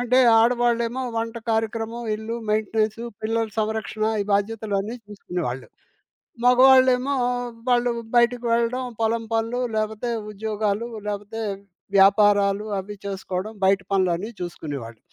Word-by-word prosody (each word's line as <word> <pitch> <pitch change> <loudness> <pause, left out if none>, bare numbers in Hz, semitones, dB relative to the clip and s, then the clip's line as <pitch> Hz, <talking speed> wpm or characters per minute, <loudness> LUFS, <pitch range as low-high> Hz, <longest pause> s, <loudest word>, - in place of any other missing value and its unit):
అంటే 245 +1 +3 0.2
ఆడవాళ్ళేమో, 240 +1 +1
వంట 230 +1 -2
కార్యక్రమం 225 +1 -2
ఇల్లు, 220 +2 -5
మెయింటెనెన్సు 215 +1 0 0.2
పిల్లల 225 +1 0
సంరక్షణ 215 0 -2 0.2
ఈ - - -7
బాధ్యతలన్నీ 205 +1 -1
చూసుకునేవాళ్ళు. 175 -10 -5 0.8
మగవాళ్ళేమో 255 +1 +6 0.6
వాళ్ళు 245 0 +3 0.2
బయటకి 240 0 +3
వెళ్ళడం. 235 +2 +1 0.2
పొలం 225 +1 +1
పనులు, 225 +2 0 0.2
లేపోతే 215 +2 -2 0.2
ఉద్యోగాలు, 215 +1 -2 0.2
లేపోతే 205 +2 -4 0.6
వ్యాపారాలు 200 +1 +4
అవి 205 +2 -7
చేసుకోవడం. 195 +1 -4
బయట 195 +1 +4
పనులన్నీ 190 +1 +1
చూసుకునేవాళ్ళు. 140 -10 -6
220 Hz, 105 wpm, -23 LUFS, 200-235 Hz, 0.8 s, మగవాళ్ళేమో